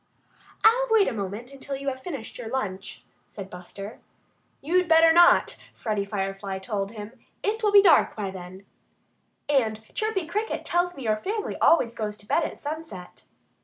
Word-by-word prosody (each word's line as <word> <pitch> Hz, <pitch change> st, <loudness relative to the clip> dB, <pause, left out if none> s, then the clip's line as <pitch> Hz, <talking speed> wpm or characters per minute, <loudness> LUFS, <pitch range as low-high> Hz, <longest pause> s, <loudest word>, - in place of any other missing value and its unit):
"I'll 485 Hz, +3 st, +5 dB
wait 445 Hz, -3 st, +4 dB
a -, -, -1 dB
moment, 210 Hz, +4 st, -5 dB
until 275 Hz, 0 st, -6 dB
you 275 Hz, +1 st, -7 dB
have 260 Hz, -1 st, -6 dB
finished 275 Hz, -11 st, -7 dB
your 240 Hz, -, -6 dB
lunch," 195 Hz, -, -4 dB, 0.2 s
said 195 Hz, -2 st, -9 dB
Buster. 195 Hz, +4 st, -9 dB, 0.6 s
"You'd 360 Hz, +5 st, +1 dB
better 325 Hz, 0 st, +6 dB
not!" 345 Hz, +1 st, +5 dB, 0.2 s
Freddie 210 Hz, -3 st, -2 dB
Firefly 195 Hz, -1 st, -3 dB
told 195 Hz, +1 st, -4 dB
him. 210 Hz, -1 st, -8 dB, 0.3 s
"It 440 Hz, +2 st, -1 dB
will 420 Hz, -2 st, +2 dB
be 405 Hz, -1 st, +8 dB
dark 365 Hz, -, +5 dB
by 200 Hz, -3 st, -3 dB
that 190 Hz, -, -8 dB
time. 185 Hz, +2 st, -12 dB, 0.8 s
And 225 Hz, -7 st, +1 dB
Chirpy 430 Hz, -5 st, -1 dB
Cricket 420 Hz, +7 st, -3 dB
tells 350 Hz, +1 st, 0 dB
me 270 Hz, -, -7 dB
your 215 Hz, -2 st, +1 dB
family 415 Hz, -, -3 dB
always 235 Hz, -8 st, +4 dB
goes 210 Hz, -2 st, -4 dB
to 205 Hz, -, -14 dB
bed 330 Hz, -, +1 dB
at -, -, -4 dB
sunset." 290 Hz, -, -8 dB
235 Hz, 170 wpm, -25 LUFS, -, 0.8 s, be